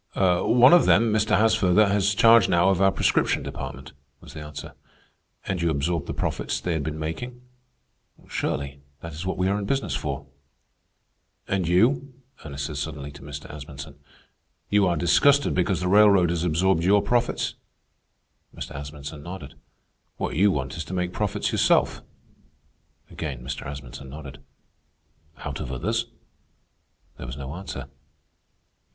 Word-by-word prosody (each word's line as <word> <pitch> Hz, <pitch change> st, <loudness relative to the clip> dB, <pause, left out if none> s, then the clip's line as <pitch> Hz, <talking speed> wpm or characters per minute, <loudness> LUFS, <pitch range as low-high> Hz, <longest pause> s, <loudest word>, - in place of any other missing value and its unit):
"One 100 Hz, -, +5 dB
of 175 Hz, -, +6 dB
them, 110 Hz, +1 st, +4 dB
Mr. 110 Hz, 0 st, +2 dB
Haasfurther, 110 Hz, -2 st, +4 dB
has 100 Hz, 0 st, +2 dB
charge 115 Hz, +1 st, +6 dB
now 85 Hz, +2 st, +4 dB
of 95 Hz, -1 st, +1 dB
our 95 Hz, 0 st, +5 dB
prescription -, -, +1 dB
department," 65 Hz, -1 st, -7 dB, 0.3 s
was -, -, -13 dB
the -, -, -8 dB
answer. 75 Hz, 0 st, -8 dB, 0.7 s
"And 90 Hz, -3 st, -2 dB
you 85 Hz, -, +2 dB
absorbed 80 Hz, +1 st, -1 dB
the -, -, -3 dB
profits 60 Hz, -, -2 dB
they 85 Hz, +6 st, -2 dB
had 80 Hz, -, -1 dB
been 75 Hz, +1 st, -4 dB
making?" 120 Hz, +11 st, -5 dB, 0.9 s
"Surely. 70 Hz, 0 st, -3 dB, 0.2 s
That 85 Hz, -1 st, -7 dB
is 80 Hz, +5 st, -6 dB
what 95 Hz, -, -2 dB
we 90 Hz, -, +1 dB
are 100 Hz, +2 st, +1 dB
in 100 Hz, -, -4 dB
business 135 Hz, +6 st, -1 dB
for." 70 Hz, -1 st, -3 dB, 1.2 s
"And 95 Hz, -3 st, 0 dB
you?" 125 Hz, +9 st, +2 dB, 0.3 s
Ernest 70 Hz, -2 st, -5 dB
said 75 Hz, 0 st, -5 dB
suddenly 70 Hz, -1 st, -5 dB
to 70 Hz, -, -13 dB
Mr. 70 Hz, 0 st, -8 dB
Asmunsen. 70 Hz, 0 st, -9 dB, 0.7 s
"You 100 Hz, -2 st, +4 dB
are 85 Hz, -2 st, +1 dB
disgusted 140 Hz, -, +4 dB
because 90 Hz, 0 st, 0 dB
the 90 Hz, -, -1 dB
railroad 100 Hz, -3 st, +5 dB
has 85 Hz, -1 st, -1 dB
absorbed 90 Hz, +1 st, +2 dB
your 100 Hz, +3 st, +4 dB
profits?" 120 Hz, 0 st, 0 dB, 1.0 s
Mr. -, -, -7 dB
Asmunsen 70 Hz, +1 st, -7 dB
nodded. 85 Hz, -4 st, -8 dB, 0.6 s
"What -, -, -3 dB
you 100 Hz, +6 st, +4 dB
want 70 Hz, -3 st, -2 dB
is 80 Hz, -, -4 dB
to 95 Hz, -, -5 dB
make 90 Hz, 0 st, -2 dB
profits 105 Hz, -2 st, -1 dB
yourself?" -, -, +2 dB, 1.1 s
Again 70 Hz, -7 st, -5 dB
Mr. 65 Hz, 0 st, -5 dB
Asmunsen 70 Hz, -1 st, -8 dB
nodded. 70 Hz, -1 st, -10 dB, 1.0 s
"Out -, -, -6 dB
of 65 Hz, -, -5 dB
others?" 110 Hz, -, -1 dB, 1.1 s
There -, -, -7 dB
was 65 Hz, +3 st, -7 dB
no 70 Hz, 0 st, -6 dB
answer. 85 Hz, -7 st, -6 dB
85 Hz, 150 wpm, -25 LUFS, 70-100 Hz, 1.2 s, of